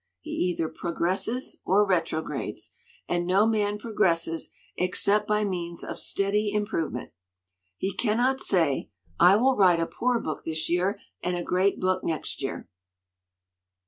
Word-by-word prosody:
He 310 Hz, -, -9 dB
either 180 Hz, -, 0 dB
progresses 185 Hz, +10 st, -1 dB
or 205 Hz, +3 st, +4 dB
retrogrades, 160 Hz, -, -2 dB, 0.4 s
and 175 Hz, 0 st, -1 dB
no 195 Hz, +3 st, +4 dB
man 210 Hz, -2 st, +1 dB
progresses 175 Hz, -7 st, 0 dB, 0.3 s
except 200 Hz, +3 st, +2 dB
by 210 Hz, 0 st, +2 dB
means 175 Hz, -3 st, -4 dB
of -, -, -5 dB
steady 205 Hz, +1 st, +1 dB
improvement. 200 Hz, -, -2 dB, 0.7 s
He 190 Hz, +1 st, -2 dB
cannot 245 Hz, +5 st, +1 dB
say, 165 Hz, -8 st, +1 dB, 0.3 s
'I 180 Hz, +2 st, +7 dB
will 260 Hz, +5 st, +3 dB
write 180 Hz, -5 st, +5 dB
a 165 Hz, -, +1 dB
poor 245 Hz, +6 st, 0 dB
book 155 Hz, -7 st, -4 dB
this 160 Hz, -1 st, -2 dB
year 180 Hz, +4 st, 0 dB, 0.2 s
and 180 Hz, 0 st, -1 dB
a 175 Hz, -, -3 dB
great 185 Hz, +3 st, +1 dB
book 185 Hz, 0 st, 0 dB
next 160 Hz, -3 st, -3 dB
year." 135 Hz, -, -4 dB
185 Hz, 140 wpm, -27 LUFS, 170-210 Hz, 0.7 s, I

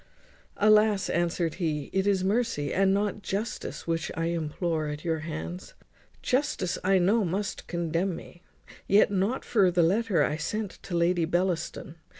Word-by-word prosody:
"Alas! 210 Hz, -1 st, +4 dB
madam," 170 Hz, -, +2 dB
answered 170 Hz, -1 st, -1 dB
he, 150 Hz, -4 st, -2 dB
"it 190 Hz, +1 st, +1 dB
is 195 Hz, -2 st, +2 dB
mercy, 195 Hz, -8 st, 0 dB
and 195 Hz, 0 st, +3 dB
not 205 Hz, +1 st, 0 dB
justice, 205 Hz, +4 st, -4 dB
which 165 Hz, -1 st, -2 dB
I 165 Hz, +1 st, 0 dB
implore 160 Hz, 0 st, -2 dB
at 150 Hz, +2 st, -6 dB
your 160 Hz, -1 st, 0 dB
hands. 160 Hz, +3 st, -6 dB, 0.5 s
Justice 255 Hz, -9 st, 0 dB
I 190 Hz, +1 st, +4 dB
know 200 Hz, +5 st, +3 dB
must 190 Hz, +3 st, -3 dB
condemn 170 Hz, +1 st, -1 dB
me. 175 Hz, +1 st, -12 dB, 0.5 s
Yet 200 Hz, +1 st, +5 dB
not 200 Hz, +6 st, 0 dB
for 200 Hz, -5 st, +3 dB
the 175 Hz, -1 st, +2 dB
letter 200 Hz, +3 st, +2 dB
I 150 Hz, -, 0 dB
sent 210 Hz, +5 st, -3 dB
to 175 Hz, -, -3 dB
Lady 170 Hz, 0 st, +2 dB
Bellaston. 175 Hz, -1 st, -2 dB
180 Hz, 155 wpm, -27 LUFS, 165-200 Hz, 0.5 s, Yet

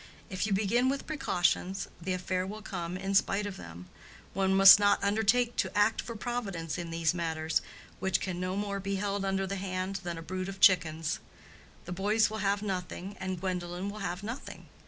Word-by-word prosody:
If 185 Hz, +2 st, -1 dB
you -, -, -3 dB
begin 225 Hz, +6 st, +2 dB
with 275 Hz, 0 st, -2 dB
precautions, 190 Hz, -, 0 dB
the 185 Hz, +2 st, -2 dB
affair 185 Hz, 0 st, -2 dB
will 215 Hz, +2 st, -7 dB
come 180 Hz, -3 st, -4 dB
in 195 Hz, +1 st, -3 dB
spite 195 Hz, +1 st, +2 dB
of 200 Hz, -2 st, -5 dB
them. 85 Hz, -, -10 dB, 0.5 s
One 190 Hz, 0 st, +1 dB
must 195 Hz, +1 st, +10 dB
not 205 Hz, -1 st, +3 dB
undertake 220 Hz, +4 st, +2 dB
to -, -, -1 dB
act 210 Hz, +2 st, +3 dB
for 230 Hz, -, -7 dB
Providence 200 Hz, -9 st, -3 dB
in 170 Hz, -1 st, -5 dB
these 165 Hz, -1 st, +1 dB
matters, 160 Hz, -2 st, -1 dB, 0.4 s
which 190 Hz, -2 st, +1 dB
can 180 Hz, -2 st, -3 dB
no 185 Hz, +1 st, -2 dB
more 200 Hz, 0 st, -2 dB
be 195 Hz, 0 st, -2 dB
held 200 Hz, 0 st, -1 dB
under 195 Hz, 0 st, 0 dB
the 195 Hz, +1 st, -3 dB
hand 185 Hz, 0 st, -3 dB
than 175 Hz, -3 st, -5 dB
a 165 Hz, -, -7 dB
brood 185 Hz, +2 st, -4 dB
of 195 Hz, 0 st, -8 dB
chickens. 165 Hz, -4 st, +3 dB, 0.7 s
The 175 Hz, -, -7 dB
boys 210 Hz, +4 st, +2 dB
will 220 Hz, -, -4 dB
have 200 Hz, +1 st, 0 dB
nothing, 190 Hz, 0 st, -4 dB
and 185 Hz, -1 st, -3 dB
Gwendolen 180 Hz, +1 st, -3 dB
will 210 Hz, -, -8 dB
have 195 Hz, -1 st, -4 dB
nothing. 230 Hz, +5 st, -7 dB
195 Hz, 195 wpm, -30 LUFS, 180-205 Hz, 0.7 s, must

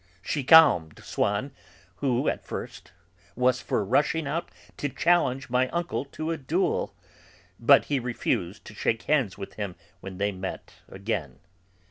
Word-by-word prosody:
She 145 Hz, +5 st, -2 dB
calmed 130 Hz, -, +6 dB
Swann, 105 Hz, +7 st, -1 dB, 0.5 s
who, 130 Hz, +5 st, 0 dB
at -, -, -1 dB
first, -, -, -7 dB, 0.4 s
was 125 Hz, +1 st, +2 dB
for 105 Hz, -, -1 dB
rushing 150 Hz, +8 st, +1 dB
out 160 Hz, +5 st, -3 dB, 0.3 s
to 145 Hz, -, -2 dB
challenge 135 Hz, -6 st, +1 dB
my 125 Hz, +1 st, +2 dB
uncle 170 Hz, -4 st, -2 dB
to 155 Hz, +3 st, -4 dB
a 165 Hz, -, -2 dB
duel, 160 Hz, +7 st, -1 dB, 0.6 s
but 135 Hz, +4 st, +6 dB
he 145 Hz, -2 st, 0 dB
refused 105 Hz, -5 st, -2 dB
to -, -, -10 dB
shake 110 Hz, +2 st, -1 dB
hands 135 Hz, -10 st, +1 dB
with 100 Hz, -, -7 dB
him 95 Hz, -4 st, -4 dB, 0.2 s
when 95 Hz, 0 st, -8 dB
they 100 Hz, +1 st, 0 dB
met 95 Hz, 0 st, -7 dB, 0.2 s
again. 95 Hz, -, -4 dB
125 Hz, 145 wpm, -27 LUFS, 100-145 Hz, 0.6 s, calmed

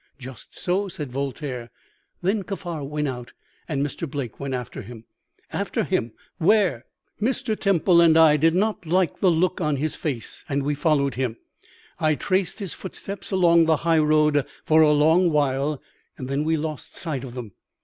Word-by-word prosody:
"'Just 130 Hz, -2 st, -11 dB
so,' 190 Hz, +3 st, 0 dB
said 150 Hz, -8 st, -6 dB
Voltaire. 135 Hz, -2 st, -4 dB, 0.5 s
'Then 200 Hz, +3 st, +1 dB
Kaffar 180 Hz, -6 st, -5 dB
went 150 Hz, +1 st, -2 dB
out, 125 Hz, -2 st, -6 dB, 0.3 s
and 145 Hz, -3 st, -1 dB
Mr. 150 Hz, +2 st, -5 dB
Blake 135 Hz, -5 st, -5 dB
went 140 Hz, -1 st, -3 dB
after 125 Hz, -2 st, -6 dB
him.' 115 Hz, +1 st, -11 dB, 0.5 s
"'After -, -, -1 dB
him! 115 Hz, -, -1 dB, 0.3 s
Where?' 185 Hz, -, +3 dB, 0.4 s
"'Mr. 240 Hz, -1 st, 0 dB
Temple 185 Hz, -4 st, +3 dB
and 165 Hz, -1 st, +6 dB
I 160 Hz, -2 st, +7 dB
did 160 Hz, +3 st, +3 dB
not 205 Hz, -3 st, 0 dB
like 180 Hz, +1 st, +1 dB
the 190 Hz, -, +4 dB
look 180 Hz, +3 st, +1 dB
on 150 Hz, -3 st, +1 dB
his 150 Hz, +3 st, -2 dB
face, 135 Hz, -8 st, -5 dB
and 140 Hz, -1 st, 0 dB
we 145 Hz, +2 st, 0 dB
followed 145 Hz, -2 st, +1 dB
him. 125 Hz, -3 st, -2 dB, 0.6 s
I 155 Hz, -1 st, +2 dB
traced 185 Hz, +2 st, 0 dB
his 195 Hz, -5 st, -5 dB
footsteps 195 Hz, +1 st, -7 dB
along 170 Hz, -3 st, +4 dB
the 160 Hz, -1 st, +4 dB
high 165 Hz, -1 st, +4 dB
road 150 Hz, -1 st, +3 dB, 0.2 s
for 160 Hz, 0 st, +5 dB
a 155 Hz, -1 st, +6 dB
long 160 Hz, +4 st, +4 dB
while, 145 Hz, -1 st, 0 dB, 0.4 s
and 130 Hz, -, -6 dB
then 140 Hz, +3 st, -1 dB
we 160 Hz, 0 st, +2 dB
lost 155 Hz, -1 st, -5 dB
sight 150 Hz, -7 st, -3 dB
of 125 Hz, -2 st, -8 dB
them. 120 Hz, -5 st, -6 dB
155 Hz, 175 wpm, -24 LUFS, 140-175 Hz, 0.6 s, I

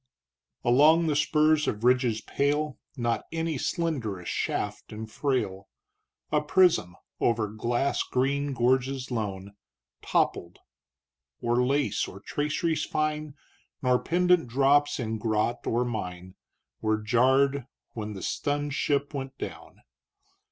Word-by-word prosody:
Along 150 Hz, +7 st, +5 dB
the 155 Hz, -2 st, +1 dB
spurs 155 Hz, +1 st, +3 dB
of 105 Hz, +1 st, -2 dB
ridges 125 Hz, -3 st, +3 dB
pale, 145 Hz, +2 st, -1 dB, 0.2 s
Not 120 Hz, -1 st, -1 dB
any 165 Hz, -3 st, -2 dB
slenderest 125 Hz, -, -2 dB
shaft -, -, -3 dB
and 110 Hz, +1 st, -6 dB
frail, 110 Hz, -6 st, -2 dB, 0.6 s
A 150 Hz, -1 st, +3 dB
prism 150 Hz, -, +3 dB, 0.2 s
over 115 Hz, -2 st, +1 dB
glass 120 Hz, +6 st, -1 dB
green 140 Hz, +2 st, 0 dB
gorges 130 Hz, +1 st, +1 dB
lone, 100 Hz, -4 st, -4 dB, 0.5 s
Toppled; 85 Hz, 0 st, 0 dB, 0.8 s
or 120 Hz, +1 st, +1 dB
lace 140 Hz, +2 st, +1 dB
or 95 Hz, -, -10 dB
traceries 150 Hz, +7 st, -1 dB
fine, 155 Hz, -1 st, -2 dB, 0.5 s
Nor 125 Hz, -1 st, +3 dB
pendant 180 Hz, -4 st, +2 dB
drops 140 Hz, +4 st, +3 dB
in 110 Hz, -2 st, -3 dB
grot 110 Hz, +2 st, -1 dB
or 120 Hz, +2 st, +1 dB
mine 90 Hz, -6 st, -5 dB, 0.5 s
Were 110 Hz, 0 st, +1 dB
jarred, 130 Hz, +4 st, +2 dB, 0.2 s
when 105 Hz, -2 st, -5 dB
the 95 Hz, -, -7 dB
stunned 145 Hz, 0 st, -1 dB
ship 145 Hz, 0 st, 0 dB
went 135 Hz, -1 st, -5 dB
down. -, -, -8 dB
130 Hz, 115 wpm, -27 LUFS, 110-145 Hz, 0.8 s, Along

